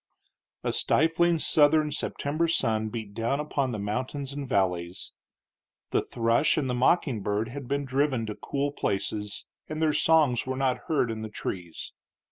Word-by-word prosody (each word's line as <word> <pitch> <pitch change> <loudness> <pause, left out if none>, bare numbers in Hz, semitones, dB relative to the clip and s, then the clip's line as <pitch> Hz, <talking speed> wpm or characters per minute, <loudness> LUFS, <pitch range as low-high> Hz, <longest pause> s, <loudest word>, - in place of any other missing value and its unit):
II. - - +1
A - - -7
stifling 165 +2 +3
Southern 150 0 +4
September 150 +2 -1
sun 110 -9 +1
beat 110 -3 -6
down 115 +6 -1
upon 140 -3 -1
the 110 - -3
mountains 130 +7 -3
and 140 -2 -5
valleys. 90 -3 -1 0.8
The - - +2
thrush 115 +5 +2
and 145 -4 0
the 125 - -1
mocking 125 - +2
bird 105 +3 -1
had 135 +1 -7
been 140 +2 -1
driven 135 -3 0
to 105 - -4
cool 140 +6 -2
places, 105 -4 -3 0.2
and 155 0 -4
their 155 -1 +2
songs 150 -8 +3
were 130 0 -2
not 130 -2 0
heard 140 -7 +2
in 110 -1 -5
the 110 - -5
trees. 90 -5 -6
130 Hz, 165 wpm, -27 LUFS, 110-145 Hz, 0.8 s, Southern